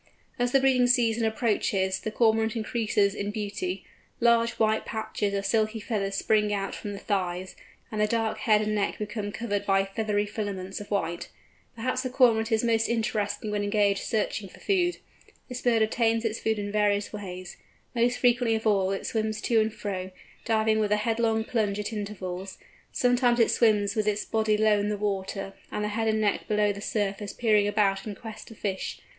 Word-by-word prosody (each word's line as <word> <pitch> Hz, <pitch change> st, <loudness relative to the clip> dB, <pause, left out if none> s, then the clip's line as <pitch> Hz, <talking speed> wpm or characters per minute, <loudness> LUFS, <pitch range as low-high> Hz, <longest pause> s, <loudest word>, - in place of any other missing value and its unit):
As 245 Hz, 0 st, +1 dB
the 270 Hz, -, +5 dB
breeding 260 Hz, -2 st, +4 dB
season 235 Hz, -2 st, +3 dB
approaches 205 Hz, -4 st, 0 dB
the -, -, -4 dB
Cormorant 220 Hz, 0 st, +2 dB
increases 215 Hz, -3 st, +1 dB
in 205 Hz, 0 st, -3 dB
beauty; 215 Hz, -, -4 dB, 0.3 s
large 235 Hz, -1 st, +4 dB
white 220 Hz, -1 st, +1 dB
patches 210 Hz, -2 st, -2 dB
of 200 Hz, 0 st, -2 dB
silky 215 Hz, +2 st, +1 dB
feathers 200 Hz, -3 st, -2 dB
spring 210 Hz, +1 st, +2 dB
out 195 Hz, -1 st, -2 dB
from 205 Hz, -, -6 dB
the -, -, -6 dB
thighs, 185 Hz, -2 st, -2 dB, 0.4 s
and 215 Hz, -1 st, -1 dB
the 210 Hz, -, +3 dB
dark 225 Hz, 0 st, -1 dB
head 215 Hz, -4 st, +3 dB
and 215 Hz, 0 st, -1 dB
neck 205 Hz, -1 st, 0 dB
become 210 Hz, -1 st, -4 dB
covered 205 Hz, -2 st, -2 dB
by 195 Hz, -1 st, +2 dB
feathery 205 Hz, +1 st, -1 dB
filaments 200 Hz, -2 st, -4 dB
of 205 Hz, -, -10 dB
white. 170 Hz, -4 st, -2 dB, 0.5 s
Perhaps 255 Hz, +3 st, -1 dB
the 255 Hz, -, -3 dB
Cormorant 235 Hz, -3 st, +3 dB
is 220 Hz, 0 st, +2 dB
most 225 Hz, -1 st, +2 dB
interesting 215 Hz, -2 st, -1 dB
when 210 Hz, 0 st, 0 dB
engaged 205 Hz, -1 st, +2 dB
searching 210 Hz, -2 st, -2 dB
for -, -, -16 dB
food. 360 Hz, -3 st, +1 dB, 0.5 s
This 250 Hz, 0 st, -5 dB
bird 230 Hz, -3 st, +3 dB
obtains 225 Hz, +1 st, +1 dB
its 225 Hz, 0 st, -1 dB
food 220 Hz, -1 st, 0 dB
in 205 Hz, 0 st, -3 dB
various 205 Hz, 0 st, +1 dB
ways. 185 Hz, -3 st, -7 dB, 0.4 s
Most 240 Hz, +1 st, +2 dB
frequently 245 Hz, -2 st, +3 dB
of 220 Hz, -, -4 dB
all, 195 Hz, -3 st, +3 dB
it 195 Hz, -, -3 dB
swims 215 Hz, -1 st, -1 dB
to 230 Hz, -2 st, +3 dB
and 215 Hz, +1 st, 0 dB
fro, 190 Hz, -3 st, -4 dB, 0.4 s
diving 220 Hz, -1 st, +2 dB
with 210 Hz, -1 st, 0 dB
a 210 Hz, -, +4 dB
headlong 225 Hz, 0 st, +1 dB
plunge 215 Hz, -4 st, -1 dB
at 210 Hz, +2 st, -4 dB
intervals; 195 Hz, -3 st, -5 dB, 0.3 s
sometimes 245 Hz, -1 st, +2 dB
it 230 Hz, -, +4 dB
swims 210 Hz, -2 st, +3 dB
with 215 Hz, -1 st, 0 dB
its 210 Hz, 0 st, 0 dB
body 220 Hz, -1 st, +1 dB
low 215 Hz, -1 st, +4 dB
in 205 Hz, +1 st, -1 dB
the 210 Hz, -, -1 dB
water, 195 Hz, -1 st, -3 dB, 0.2 s
and 210 Hz, -, -2 dB
the 210 Hz, -, -1 dB
head 225 Hz, +2 st, -1 dB
and 220 Hz, 0 st, +2 dB
neck 210 Hz, -2 st, 0 dB
below 210 Hz, -1 st, +2 dB
the 200 Hz, -, -8 dB
surface 205 Hz, -1 st, -2 dB
peering 215 Hz, -3 st, +3 dB
about 205 Hz, -1 st, +1 dB
in 205 Hz, -, -5 dB
quest 220 Hz, +1 st, -9 dB
of 225 Hz, -, -13 dB
fish. 190 Hz, -2 st, -3 dB
215 Hz, 190 wpm, -27 LUFS, 205-225 Hz, 0.5 s, the